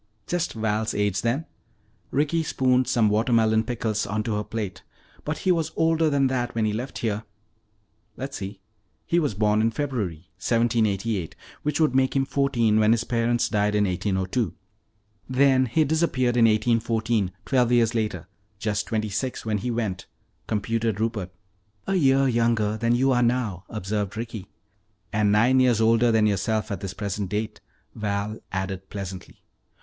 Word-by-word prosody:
'" 105 - -43
"Just 175 0 -1
Val's 110 0 -1
age, 105 -2 0
then." 130 +7 0 0.6
Ricky 150 +4 +1
spooned 130 -4 +1
some 115 -3 +3
watermelon 110 0 +3
pickles 110 -2 -2
onto 110 +2 -2
her 105 - -1
plate. 105 -5 -5 0.4
"But 150 +1 -3
he 185 - +5
was 165 -3 0
older 160 -1 +2
than 140 -2 +2
that 125 -2 -1
when 110 -1 +1
he 105 - 0
left 125 +5 -4
here." 105 -1 -1 1.0
"Let's 135 +1 -5
see. 95 0 -7 0.4
He 170 - +2
was 145 - -1
born 105 +1 +2
in 115 - +3
February, 110 - -3
1788, 110 -5 0 0.3
which 150 0 -1
would 155 -5 +3
make 130 0 +2
him 135 0 +2
fourteen 120 -6 +2
when 110 +1 +5
his 115 0 0
parents 120 0 +1
died 105 -1 +1
in 105 - +3
1802. 95 +1 -1 0.7
Then 130 0 +4
he 140 +8 +2
disappeared 140 -5 +1
in 120 -1 +5
1814, 110 -2 +1
twelve 125 -3 +2
years 120 -1 +3
later. 105 -7 -2 0.3
Just 105 -1 -2
twenty 110 -1 -1
six 125 +6 -3
when 105 -2 0
he 125 - -3
went," 110 -6 -3 0.4
computed 110 0 -1
Rupert. 110 -5 -2 0.6
"A 195 - -1
year 135 -6 +4
younger 115 -3 +1
than 115 +2 +1
you 135 +2 +3
are 120 -1 +3
now," 115 -7 0
observed 105 0 -3
Ricky. 110 -4 -5 0.7
"And 105 -1 +2
nine 120 +5 +4
years 125 -3 +4
older 115 +1 +4
than 110 -1 +3
yourself 105 +2 0
at 100 - -3
this 95 0 -6
present 100 -2 -3
date," 105 +2 -3 0.3
Val 105 0 -3
added 95 0 -4
pleasantly. 95 -3 -8
115 Hz, 160 wpm, -25 LUFS, 105-125 Hz, 1.0 s, he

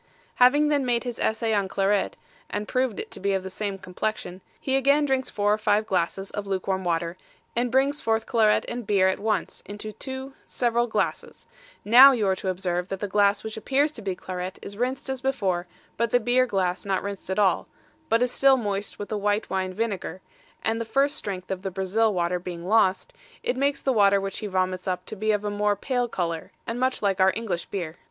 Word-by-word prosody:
Having 290 +4 +5
then 290 -2 +2
made 240 -2 +1
his 245 -2 -5
essay 225 0 0
on 200 -2 +1
claret, 195 +1 0 0.3
and 210 +1 -3
proved 255 -4 0
it - - -6
to - - -7
be 200 +1 0
of 190 -1 -1
the 190 - -6
same 200 0 -3
complexion, 185 0 -4 0.2
he 265 - -1
again 280 +2 +4
drinks 265 -2 0
four 205 0 +1
or 215 - -1
five 215 0 +2
glasses 195 0 -1
of 205 -1 -5
luke 190 -2 -2
warm 190 -1 -1
water, 170 0 -1 0.4
and 240 +1 +1
brings 275 +3 +2
forth 225 0 0
claret 220 -3 +3
and 240 -3 -5
beer 195 -2 +4
at 190 - 0
once 210 -3 -1
into 210 +1 -6
two 265 +3 -7
several 240 0 +1
glasses: 220 - -2 0.4
now 255 +6 +9
you 225 -5 0
are 190 -1 +2
to 190 - -3
observe 180 -1 -1
that 195 0 -4
the 205 - -2
glass 200 0 +2
which 220 0 -5
appears 275 +7 +1
to - - -10
be 195 -2 -2
claret 185 +1 -5
is 200 - -8
rinsed 255 +5 -2
as 265 -1 -3
before, 195 -10 -1 0.3
but 235 0 +1
the 245 - +3
beer 245 +2 +2
glass 185 -4 -1
not 195 -2 -1
rinsed 200 -2 -6
at 190 - -1
all, 200 -3 +2 0.4
but 230 +2 +3
is 250 - 0
still 270 0 +5
moist 205 -3 -3
with 205 - -6
the 215 - -2
white 205 -1 0
wine 190 -1 -1
vinegar, 200 -2 -3 0.4
and 225 +1 0
the - - 0
first 275 +6 +1
strength 185 -2 -5
of 185 -1 -3
the 195 - -3
Brazil 195 +4 +1
water 180 -1 0
being 175 -1 -7
lost, 220 - +2 0.3
it - - 0
makes 280 +2 0
the 265 - +2
water 200 -3 +5
which 195 0 -4
he 215 - -4
vomits 185 -1 -1
up 185 -1 -2
to - - -7
be 215 +2 0
of 210 -1 0
a 205 - -1
more 205 0 +1
pale 245 +3 -1
colour, 170 -6 -3
and 230 +2 -3
much 255 -3 0
like 195 -1 +1
our 190 0 +6
English 195 -7 -3
beer. 175 -4 -5
205 Hz, 220 wpm, -25 LUFS, 190-240 Hz, 0.4 s, now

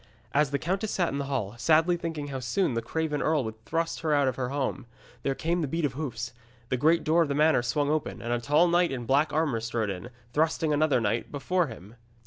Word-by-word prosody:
As 150 0 +3
the 140 - 0
countess 190 +8 -2
sat 175 -6 0
in 140 - -2
hall, 135 -8 -2
sadly 165 +5 +4
thinking 160 -4 -4
how 135 -1 -4
soon 135 +5 0
the 115 - -1
craven 150 +4 -2
earl 155 -3 +2
would 110 -1 -7
thrust 165 0 -1
her 155 -2 +1
out 140 -2 +3
of 130 - 0
her 125 -1 -2
home, 135 -3 -2 0.3
there 135 - -1
came 170 +4 0
the 155 - -1
beat 165 +3 -1
of 135 - -1
hoofs, 120 -5 -4 0.4
the - - +1
great 160 +6 +3
door 165 +2 +3
of 165 - +2
the 140 - -1
manor 155 -3 +4
swung 145 +4 0
open, 155 -1 -2
and 120 +1 -2
a 120 - 0
tall 150 +7 +4
knight 175 -1 +3
in 125 -3 -4
black 140 +6 +2
armour 150 -6 +1
strode 115 -2 -2
in, 95 +6 -7 0.2
thrusting 160 0 +1
another 145 -3 +3
knight 115 +1 -1
before 175 +4 0
him. 110 -3 -11
145 Hz, 235 wpm, -28 LUFS, 125-160 Hz, 0.4 s, sadly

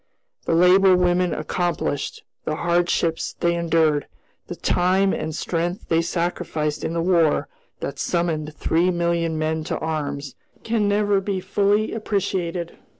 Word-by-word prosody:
The 165 - +1
labor 185 +2 +6
women 180 0 +2
accomplished, 155 -2 -2 0.2
the 155 - -2
hardships 170 -1 0
they 170 0 +2
endured, 160 -3 +1 0.4
the - - -5
time 190 +2 +2
and 155 0 -3
strength 175 +3 -3
they 165 0 +3
sacrificed 165 -3 -2
in 165 - -2
the 165 0 0
War 170 -4 +2 0.3
that - - -5
summoned 155 -3 -1
three 170 +3 +1
million 170 -2 0
men 155 0 -1
to - - -2
arms, 145 -4 -3 0.3
can 225 -2 +1
never 205 -1 +2
be 195 -1 -2
fully 200 +3 +1
appreciated. 185 -5 -2
170 Hz, 135 wpm, -23 LUFS, 160-185 Hz, 0.4 s, labor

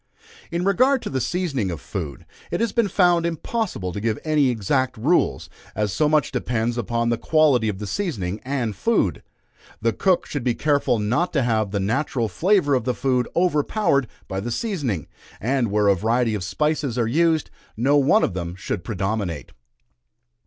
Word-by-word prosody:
In 175 +1 -2
regard 255 +7 +3
to - - -4
the 130 -1 -1
seasoning 150 - -1
of 85 -4 -4
food, 80 - -6 0.2
it - - -2
has 230 -1 +1
been 230 -1 +2
found 175 -3 +3
impossible 170 - -2
to 100 - -4
give 110 0 0
any 150 -4 +3
exact 125 +3 0
rules, 150 +11 +1 0.3
as 105 -2 -1
so 150 -1 +2
much 155 -1 +2
depends 120 -2 -1
upon 115 0 -1
the 115 -1 0
quality 145 -8 +3
of 100 - -3
the 105 - -5
seasoning 105 - -3
and 125 -6 -2
food. 100 - +1 0.6
The 115 0 +1
cook 185 - +2
should 145 -4 -4
be 120 -2 +1
careful 140 -4 +1
not 125 +12 0
to 140 -4 +2
have 110 -3 +1
the 100 +1 -2
natural 115 +3 0
flavor 180 - +2
of 125 -3 +2
the 125 +1 -1
food 125 0 +1
overpowered 150 - +2 0.2
by 95 - -3
the 110 +5 -4
seasoning; 140 - -2 0.3
and 125 0 0
where 105 0 +2
a 100 - +6
variety 115 +4 +1
of 105 -3 -3
spices 150 - -1
are 120 - +2
used, 160 +4 +2 0.3
no 135 +6 +3
one 145 +10 +4
of 100 - 0
them 85 -1 -4
should 90 -1 -4
predominate. 95 -5 -3
125 Hz, 180 wpm, -23 LUFS, 105-155 Hz, 0.6 s, a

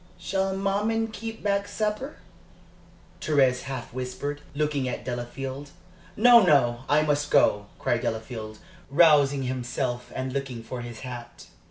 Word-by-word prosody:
"Shall 190 +2 -1
maman 210 +3 0
keep 225 +1 -7
back 200 -1 +1
supper?" 215 +7 -2 1.1
Thérèse 135 -4 +3
half 130 -3 -6
whispered, 130 +3 -4
looking 145 -3 0
at - - -5
Delafield. 130 +3 -5 0.5
"No, 240 +2 +8
no, 130 - +3
I 150 +1 +4
must 145 -1 0
go!" 105 -7 +3
cried 120 0 0
Delafield, 110 -1 -4 0.3
rousing 145 -3 +5
himself 125 -1 -3
and 130 0 -3
looking 130 -4 -4
for 125 +1 -6
his 120 -2 -8
hat. 120 -2 -8
140 Hz, 130 wpm, -26 LUFS, 125-180 Hz, 1.1 s, No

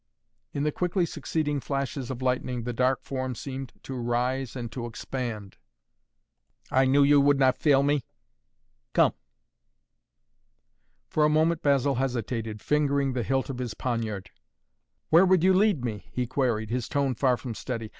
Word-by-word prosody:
In 140 - -2
the 150 - +1
quickly 180 +2 0
succeeding 150 -2 -2
flashes 135 -1 -3
of 130 -1 -5
lightning 125 -1 -1
the 120 +1 -3
dark 130 +2 +1
form 130 -2 -3
seemed 135 +1 -6
to 135 - -6
rise 125 +1 -1
and 120 -3 -5
to 120 -1 -5
expand. 115 -4 -5 1.1
"I 130 +1 +4
knew 140 +2 +5
you 145 0 +6
would 145 0 +4
not 130 -2 +4
fail 140 -3 +4
me! 145 -1 +1 0.9
Come!" - - +4 1.9
For 155 - +1
a 150 - +5
moment 160 +2 +2
Basil 140 -1 +2
hesitated, 115 -4 -3
fingering 140 -2 +1
the 125 - -1
hilt 135 +4 -1
of 125 - -7
his 120 -4 -4
poniard. 115 -6 -3 0.8
"Where 165 +3 +7
would 185 -2 +4
you 190 0 +5
lead 190 - +3
me?" 105 -4 -5
he 125 - -1
queried, 115 -4 -1
his 125 -1 -2
tone 140 -2 +1
far 125 +1 +2
from 120 -2 -6
steady. 115 -1 -5
130 Hz, 155 wpm, -27 LUFS, 120-145 Hz, 1.9 s, Where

